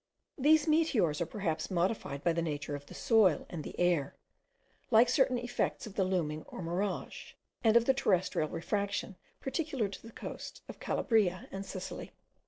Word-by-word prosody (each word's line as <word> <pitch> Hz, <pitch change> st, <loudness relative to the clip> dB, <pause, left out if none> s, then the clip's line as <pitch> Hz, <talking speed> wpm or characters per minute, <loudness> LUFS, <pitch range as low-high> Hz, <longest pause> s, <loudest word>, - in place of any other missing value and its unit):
These 300 Hz, +3 st, +5 dB
meteors 250 Hz, -, +2 dB
are 170 Hz, -, 0 dB
perhaps 165 Hz, -7 st, -2 dB
modified 175 Hz, -6 st, -1 dB
by 170 Hz, -, +3 dB
the 170 Hz, -, 0 dB
nature 150 Hz, -3 st, -3 dB
of 145 Hz, 0 st, -9 dB
the -, -, -11 dB
soil 210 Hz, -, +4 dB
and 165 Hz, -3 st, -5 dB
the -, -, -8 dB
air, 170 Hz, -6 st, +2 dB, 0.7 s
like 235 Hz, 0 st, +6 dB
certain 260 Hz, -1 st, +3 dB
effects 245 Hz, 0 st, -2 dB
of 215 Hz, -, -9 dB
the 195 Hz, -, +1 dB
looming 165 Hz, -5 st, -1 dB
or 185 Hz, -, -7 dB
mirage, 180 Hz, +3 st, -3 dB, 0.3 s
and 225 Hz, 0 st, +6 dB
of 235 Hz, -, +3 dB
the 265 Hz, -, +5 dB
terrestrial 185 Hz, -, +1 dB
refraction 200 Hz, +2 st, -2 dB, 0.3 s
peculiar 270 Hz, -, -1 dB
to 195 Hz, -, -9 dB
the -, -, -11 dB
coasts -, -, -8 dB
of -, -, -9 dB
Calabria 205 Hz, -6 st, +1 dB
and 195 Hz, 0 st, -6 dB
Sicily. 185 Hz, -1 st, -6 dB
195 Hz, 170 wpm, -32 LUFS, 170-235 Hz, 0.7 s, like